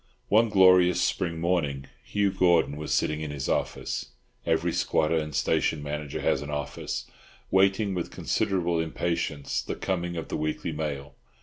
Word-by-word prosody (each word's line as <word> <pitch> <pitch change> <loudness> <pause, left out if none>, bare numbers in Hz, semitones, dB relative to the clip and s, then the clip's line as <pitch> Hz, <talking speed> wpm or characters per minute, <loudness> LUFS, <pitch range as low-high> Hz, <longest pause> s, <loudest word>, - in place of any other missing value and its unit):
One 110 +2 +5
glorious 90 -3 +6
spring 85 -2 0
morning, 80 -6 0 0.2
Hugh 100 -1 0
Gordon 85 -6 +3
was 75 +1 -5
sitting 75 0 +1
in 75 - -4
his 70 -2 -4
office—every 60 +1 -2
squatter 80 +1 +1
and 75 -1 -3
station 75 -2 +1
manager 75 -1 -4
has - - +1
an 75 - -6
office—waiting 95 - -1
with 90 -2 -3
considerable 85 -3 0
impatience 80 -3 -2
the - - -4
coming 85 -2 -2
of 80 - -5
the - - -2
weekly 80 +2 -2
mail. 75 -2 -4
80 Hz, 140 wpm, -27 LUFS, 75-90 Hz, 0.2 s, glorious